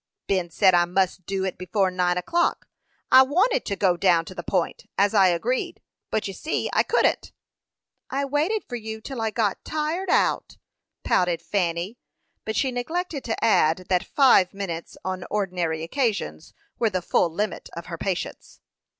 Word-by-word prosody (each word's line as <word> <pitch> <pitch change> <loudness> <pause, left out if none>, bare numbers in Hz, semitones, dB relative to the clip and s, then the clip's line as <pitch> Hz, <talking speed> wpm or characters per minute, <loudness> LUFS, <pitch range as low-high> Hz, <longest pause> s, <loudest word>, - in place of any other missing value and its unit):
"Ben 185 -3 0
said 185 +3 +4
I 175 0 +5
must 185 0 -1
do 195 -1 -1
it 190 - -4
before 185 +1 0
nine 180 -1 +1
o'clock. 340 - 0 0.4
I 260 - +10
wanted 355 - +2
to 200 - -1
go 185 -2 +2
down 170 -2 +3
to 185 - -9
the 175 - -6
Point, 175 0 -2
as 200 +2 +3
I 195 -3 +6
agreed, 215 +9 -1 0.3
but 215 - -1
you 195 - -5
see 305 - -2
I - - +4
couldn't." - - +1 0.8
"I 275 +1 -1
waited 305 +10 0
for 245 - -4
you 220 -1 -6
till 240 +2 -6
I 220 - +1
got 215 -3 -1
tired 315 +5 -2
out," - - +1 0.5
pouted 175 -2 +2
Fanny; 180 +3 -2 0.5
but 220 - -3
she 265 - +1
neglected 305 +4 -3
to 225 - -3
add 180 -5 +3
that 180 -2 +2
five 245 -10 +4
minutes 170 -4 -5
on 185 -1 -3
ordinary 180 -6 -1
occasions 230 +3 -2 0.2
were 230 - +3
the 185 -3 -2
full 175 - +2
limit 205 +5 -3
of 170 - -6
her 170 - -6
patience. 185 -2 -4
195 Hz, 170 wpm, -24 LUFS, 180-245 Hz, 0.8 s, I